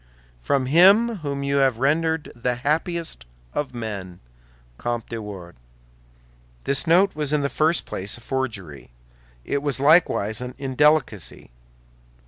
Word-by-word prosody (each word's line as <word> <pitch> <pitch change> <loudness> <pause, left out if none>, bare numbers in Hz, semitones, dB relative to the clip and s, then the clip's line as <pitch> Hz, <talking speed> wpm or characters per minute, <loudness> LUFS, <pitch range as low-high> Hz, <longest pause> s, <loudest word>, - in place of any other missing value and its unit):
From 130 - 0
him 200 - +5
whom 140 -4 -4
you 140 0 0
have 135 -4 +3
rendered 160 +4 0
the 120 +1 -1
happiest 155 - -2 0.3
of 145 -4 -3
men, 100 -6 -6 0.6
COMTE 120 -1 -3
DE 115 - -4
WARDES 95 - -10 1.0
This 140 +4 -1
note 185 +4 +4
was 150 -2 -2
in 150 -1 +2
the 140 - 0
first 160 +3 +1
place 100 +5 -3
a - - -15
forgery; 110 - -4 0.6
it 140 - -1
was 140 -2 -1
likewise 140 - +3
an 125 0 -6
indelicacy. 135 - 0
140 Hz, 130 wpm, -23 LUFS, 115-155 Hz, 1.0 s, him